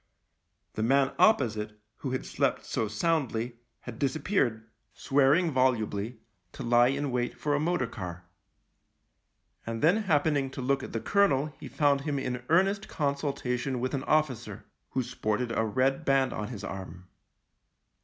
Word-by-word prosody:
The - - -3
man 135 +4 +3
opposite, 110 - +2 0.2
who 135 - -4
had 130 0 -3
slept - - -1
so 110 - -1
soundly, 120 -1 -1 0.2
had 120 -1 -9
disap 140 +2 -1
peared, 120 - 0 0.3
swearing 145 +5 +3
volubly, 120 -4 0 0.4
to - - -7
lie 120 +1 +5
in 140 +1 -1
wait 125 0 -2
for 150 - -1
a 145 - +2
motor 160 -3 +1
car. 90 -5 -7 1.4
And 115 +2 -4
then 175 +7 +5
happening 150 -8 +1
to - - -7
look 135 +2 +1
at - - -8
the 115 - -2
colonel 155 -8 +2
he - - -8
found 140 -2 +2
him 145 -1 -2
in 125 -2 -3
earnest 195 +5 +3
con 145 -3 0
sultation 135 -2 -2
with 130 +1 -2
an 135 -2 -1
officer, 155 -6 0 0.2
who 130 - -1
sported 115 +1 -2
a 110 - +2
red 130 +6 +1
band 135 -3 +2
on 105 - -4
his 115 -5 -7
arm. 95 -1 -7
130 Hz, 155 wpm, -29 LUFS, 115-145 Hz, 1.4 s, lie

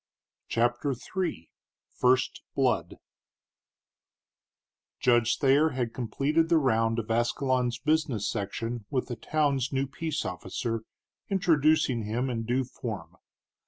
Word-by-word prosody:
CHAPTER 120 +4 +1 0.2
III 170 - -2 0.5
FIRST 125 0 +2
BLOOD - - +1 2.0
Judge 120 -1 +3
Thayer 140 +3 +4
had 120 -3 -1
completed 140 +8 0
the 170 - +5
round 115 -5 +2
of 115 -1 -3
Ascalon's 120 +1 +1
business 145 - 0
section 115 +2 -3
with 130 -3 -1
the 120 - -3
town's 140 +1 0
new 135 0 0
peace 150 +3 -3
officer, 110 +5 -3 0.4
introducing 155 - +3
him 120 +5 -1
in 115 -2 -3
due 125 +3 +1
form. 105 -9 -7
125 Hz, 110 wpm, -28 LUFS, 115-140 Hz, 2.0 s, the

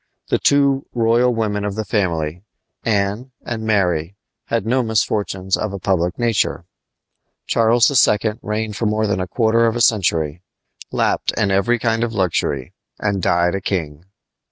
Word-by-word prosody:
The - - +1
two 140 -1 +2
royal 120 +2 +3
women 105 -3 -1
of 100 -1 -3
the 110 0 -3
family 85 -5 -1 0.4
Anne 105 +4 -1
and 115 -2 -4
Mary 90 -5 0 0.3
had 115 -3 -1
no 125 +3 +2
misfortunes 100 -4 0
of 105 -2 -3
a - - -3
public 90 -2 0
nature. 115 -7 0 0.8
Charles 115 +2 +3 0.2
II. 105 +1 +1
reigned 105 0 -3
for 110 - -1
more 110 +1 0
than 100 -3 0
a 90 - -2
quarter 115 +2 +2
of 115 - 0
a - - -1
century, 85 -8 +1 0.5
lapped - - 0
in 100 -2 +1
every 110 +5 +2
kind 115 0 0
of 115 -1 -2
luxury, 85 -9 -1 0.2
and 100 -2 -1
died 85 0 +2
a 95 - -2
king. 80 -4 -3
105 Hz, 155 wpm, -19 LUFS, 95-115 Hz, 0.8 s, royal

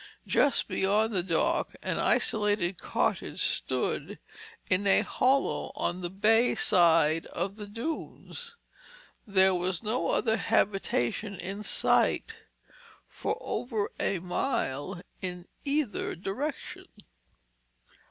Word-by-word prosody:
Just 285 -4 +3
beyond 210 +3 +1
the 185 - +1
dock 170 -2 0
an - - -1
isolated 205 -4 +1
cottage - - -1
stood - - -1 0.5
in 195 +2 +1
a 195 - +5
hollow 270 +2 +1
on 180 +1 -2
the 175 - -3
bay 220 +5 +3
side 165 -2 +4
of 190 +3 -3
the 210 -1 -7
dunes. 325 - -6 0.7
There 190 -1 +4
was 180 +2 -1
no 220 +3 -1
other 220 -2 +2
habitation 200 - 0
in 195 +3 -5
sight - - +1 0.7
for - - -3
over 220 -4 -2
a 195 - 0
mile 175 - -2 0.2
in 180 -1 -5 0.2
either 280 -6 -1
direction. 255 - -5
200 Hz, 105 wpm, -29 LUFS, 180-225 Hz, 0.7 s, a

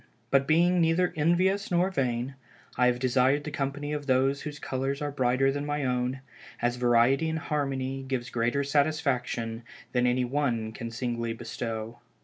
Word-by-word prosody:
But 135 0 +3
being 175 +3 +4
neither 165 +2 +2
envious 185 +6 +2
nor 180 +2 +2
vain, 125 -4 -1 0.4
I 125 - +4
have 125 0 +2
desired 130 +3 +2
the 150 - -5
company 145 0 -3
of 145 -1 -4
those 135 +1 +2
whose 150 -1 -6
colors 135 0 -2
are 145 -1 -2
brighter 130 0 +2
than 145 +1 -3
my 145 -1 -2
own, 125 +1 -1 0.4
as 120 0 0
variety 125 +5 +3
in 160 - -1
harmony 135 -4 -2
gives 125 -2 -3
greater 120 +4 +1
satisfaction 140 -6 0 0.3
than 125 -1 +2
any 125 +1 +2
one 120 -5 -1
can 115 +1 -6
singly 115 0 -2
bestow. 115 0 -5
135 Hz, 160 wpm, -28 LUFS, 125-145 Hz, 0.4 s, being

